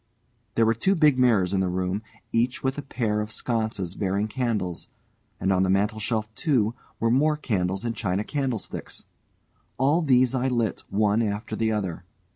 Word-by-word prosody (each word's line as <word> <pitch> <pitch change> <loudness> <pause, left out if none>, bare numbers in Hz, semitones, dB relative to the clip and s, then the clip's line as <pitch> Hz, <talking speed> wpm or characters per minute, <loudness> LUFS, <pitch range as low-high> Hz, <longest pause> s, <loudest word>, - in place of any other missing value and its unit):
There 115 - +4
were 115 - +4
two 190 - +1
big 150 -6 +4
mirrors 105 -7 +3
in 95 - +2
the 95 -1 +1
room, 90 +2 -1 0.3
each 120 +2 0
with 130 +2 0
a - - -2
pair 115 -6 -1
of 105 0 -5
sconces 110 -6 -2
bearing 100 +1 -1
candles, 110 -8 -2 0.5
and 95 +1 +2
on 95 - +2
the 95 - +2
mantelshelf, 105 +3 0
too, 120 -5 +1 0.3
were 115 0 +2
more 150 +4 +3
candles 95 -6 -1
in 115 - -1
china 100 -3 -1
candlesticks. 135 -4 -4 0.7
All 145 +6 +3
these 130 -4 +4
I 130 0 +1
lit 120 -5 0
one 105 +2 +2
after 105 0 -2
the 110 0 +1
other. 95 -6 -2
110 Hz, 170 wpm, -25 LUFS, 100-125 Hz, 0.7 s, There